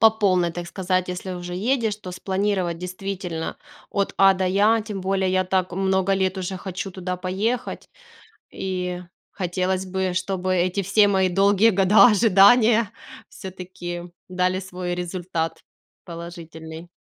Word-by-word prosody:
по 225 Hz, -1 st, +8 dB
полной, 185 Hz, -5 st, +1 dB
так 175 Hz, 0 st, -6 dB
сказать, 185 Hz, 0 st, -1 dB
если 180 Hz, +1 st, -5 dB
уже 175 Hz, -1 st, -6 dB
едешь, 225 Hz, +1 st, 0 dB
то 190 Hz, -4 st, -9 dB
спланировать, 190 Hz, -2 st, -1 dB
действительно, 180 Hz, -2 st, -5 dB, 0.3 s
от 200 Hz, -1 st, -1 dB
А 195 Hz, 0 st, +6 dB
до 190 Hz, 0 st, -1 dB
Я. 210 Hz, +4 st, +3 dB
Тем 210 Hz, -2 st, -6 dB
более 190 Hz, 0 st, 0 dB
я 185 Hz, 0 st, +2 dB
так 185 Hz, 0 st, 0 dB
много 190 Hz, 0 st, +1 dB
лет 190 Hz, 0 st, 0 dB
уже 185 Hz, 0 st, -4 dB
хочу 190 Hz, +1 st, -5 dB
туда 185 Hz, 0 st, -4 dB
поехать, 205 Hz, +7 st, -3 dB, 0.6 s
и 180 Hz, -1 st, -3 dB, 0.3 s
хотелось 185 Hz, +1 st, -2 dB
бы, 190 Hz, 0 st, -2 dB
чтобы 185 Hz, 0 st, -1 dB
эти 185 Hz, +2 st, +1 dB
все 205 Hz, +2 st, +4 dB
мои 190 Hz, -2 st, +2 dB
долгие 200 Hz, +4 st, +4 dB
года 195 Hz, +1 st, +6 dB
ожидания 220 Hz, +1 st, +5 dB, 0.4 s
всё-таки 180 Hz, -2 st, -8 dB, 0.2 s
дали 185 Hz, 0 st, 0 dB
свой 180 Hz, -1 st, -5 dB
результат 175 Hz, -2 st, -3 dB, 0.5 s
положительный. 165 Hz, -1 st, -9 dB
185 Hz, 140 wpm, -23 LUFS, 180-195 Hz, 0.6 s, по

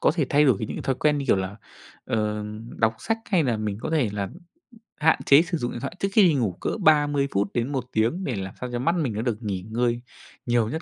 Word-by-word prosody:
có -, -, +4 dB
thể 160 Hz, -5 st, +1 dB
thay 145 Hz, +1 st, +5 dB
đổi 125 Hz, -8 st, +4 dB
như 110 Hz, -, -3 dB
những -, -, -5 dB
thói 135 Hz, -, 0 dB
quen 150 Hz, +2 st, +1 dB
như, 140 Hz, -, -3 dB
kiểu 110 Hz, -, +4 dB
là, 95 Hz, +2 st, -3 dB, 0.5 s
ờ, 105 Hz, -1 st, -1 dB, 0.3 s
đọc 110 Hz, 0 st, +2 dB
sách 225 Hz, 0 st, -1 dB
hay 175 Hz, -6 st, +3 dB
là 120 Hz, -4 st, +1 dB
mình 105 Hz, -1 st, -3 dB
có -, -, -4 dB
thể 145 Hz, -10 st, +1 dB
là 100 Hz, -2 st, -2 dB, 0.7 s
hạn 160 Hz, +1 st, +3 dB
chế 140 Hz, +3 st, +7 dB
sử 170 Hz, -1 st, -2 dB
dụng 120 Hz, -4 st, -3 dB
điện 120 Hz, -, -5 dB
thoại 140 Hz, -, -5 dB
trước 195 Hz, -, +1 dB
khi 210 Hz, 0 st, +6 dB
đi 170 Hz, -4 st, +5 dB
ngủ 120 Hz, -8 st, +1 dB
cỡ -, -, -1 dB
30 145 Hz, -3 st, +4 dB
phút 100 Hz, +1 st, +1 dB
đến 120 Hz, +3 st, -1 dB
1 130 Hz, -3 st, -2 dB
tiếng, 115 Hz, +13 st, 0 dB
để 125 Hz, -, -2 dB
làm 95 Hz, -1 st, -5 dB
sao 125 Hz, -, -4 dB
cho 120 Hz, -, -2 dB
mắt 165 Hz, +7 st, +1 dB
mình 145 Hz, -10 st, -1 dB
nó 105 Hz, -, -2 dB
được 115 Hz, -2 st, -2 dB
nghỉ 95 Hz, -3 st, -2 dB
ngơi 120 Hz, +1 st, 0 dB, 0.4 s
nhiều 120 Hz, -2 st, +2 dB
nhất 160 Hz, +5 st, -3 dB
125 Hz, 265 wpm, -25 LUFS, 110-150 Hz, 0.7 s, chế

